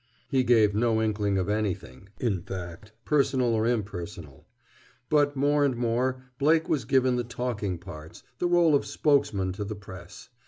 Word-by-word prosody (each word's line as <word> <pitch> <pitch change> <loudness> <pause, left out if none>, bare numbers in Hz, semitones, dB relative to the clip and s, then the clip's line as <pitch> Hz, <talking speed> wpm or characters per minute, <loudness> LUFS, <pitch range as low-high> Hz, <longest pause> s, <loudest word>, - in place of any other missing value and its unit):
He 130 -1 +3
gave 115 -4 +4
no 110 +1 +2
inkling 105 -2 0
of 95 - -1
anything, 100 - -3
in 100 -8 0
fact, 90 +2 -8
personal 130 -5 +2
or 110 0 +1
impersonal. 90 - -4 0.6
But 145 -1 +3
more 145 +2 +2
and 135 -3 +1
more 125 +2 0 0.2
Blake 160 +3 +3
was 130 -7 0
given 130 -1 +2
the 120 - 0
talking 115 -6 -3
parts, 80 -2 -11 0.2
the 175 - +1
rôle 175 -3 +4
of 140 - +3
spokesman 100 -11 +1
to 105 +2 -4
the 105 +1 -5
press. 95 -3 -12
110 Hz, 160 wpm, -27 LUFS, 95-130 Hz, 0.6 s, gave